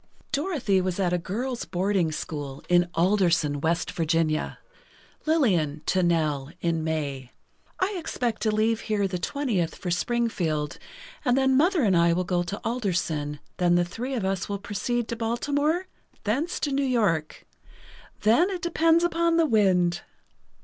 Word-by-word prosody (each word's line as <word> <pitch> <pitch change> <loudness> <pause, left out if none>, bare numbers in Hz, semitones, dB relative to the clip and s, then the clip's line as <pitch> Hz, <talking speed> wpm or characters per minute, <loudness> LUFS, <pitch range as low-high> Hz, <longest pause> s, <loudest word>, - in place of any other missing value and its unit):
Dorothy 280 - +1
was 185 0 -2
at 180 -2 +1
a 180 - +1
girls' 235 +8 -3
boarding 185 -2 0
school, 145 -3 -5
in 175 0 +3
Alderson, 170 -6 +2
West 165 +1 0
Virginia. 160 -1 0 0.7
Lillian 175 - +2
to 185 - +2
Nell, 155 -5 +1
in 165 -2 0
May: 140 -5 -3 0.5
"I 375 +3 +1
expect 245 -8 -2
to 220 - +2
leave 220 +1 +1
here 210 -3 0
the 180 -1 -3
20th 215 - -1
for 180 - -4
Springfield 175 -8 -1 0.4
and 250 -2 +2
then 265 -1 +3
Mother 335 +2 +3
and 195 -4 +3
I 170 0 +4
will 180 +2 0
go 175 0 0
to 175 +4 -4
Alderson, 170 - -1 0.2
then 175 -1 +3
the 175 0 +3
three 245 +9 -4
of 220 -6 -2
us 190 0 -2
will 200 - -1
proceed 220 +4 -2
to 235 - -2
Baltimore—thence 285 - -2
to 290 - 0
New 275 +1 +1
York—then 220 - -1
it 370 -3 -5
depends 330 0 +3
upon 335 -1 +2
the 330 - +4
wind." 185 - +2
195 Hz, 150 wpm, -26 LUFS, 170-250 Hz, 0.7 s, I